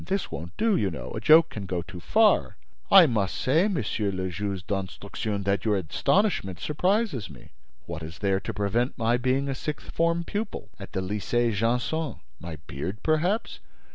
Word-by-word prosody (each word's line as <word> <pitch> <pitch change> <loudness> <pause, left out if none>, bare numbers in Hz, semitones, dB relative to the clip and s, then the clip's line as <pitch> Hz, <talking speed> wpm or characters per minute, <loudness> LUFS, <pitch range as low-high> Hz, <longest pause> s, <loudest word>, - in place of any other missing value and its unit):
This 195 0 -2
won't 85 +2 -7
do, 225 -2 +3
you 100 - +1
know; 65 -7 -7
a - - -4
joke 160 +1 +7
can 100 -3 -6
go 90 -2 -2
too 90 +1 -9
far!" 215 - +3 0.3
"I 190 -3 +9
must 105 - 0
say, 160 +9 +2
Monsieur 115 - -1
le 95 -1 -2
Juge 95 0 -4
d'Instruction, 100 +1 -3
that 100 0 0
your 105 -2 +2
astonishment 95 - +1
surprises 180 - 0
me. 70 -5 -14 0.3
What 85 -1 -6
is 80 +1 -8
there 95 -1 +1
to - - -5
prevent 115 +5 -1
my 120 0 +2
being 130 +2 +1
a 135 - -1
sixth 150 +3 -5
form 170 +1 +1
pupil 205 - -4
at 100 - -9
the 95 - -1
Lycée 105 +5 0
Janson? 125 +9 0 0.2
My 85 -2 -6
beard, 85 +11 -5
perhaps? 175 +8 0
110 Hz, 175 wpm, -26 LUFS, 95-160 Hz, 0.3 s, I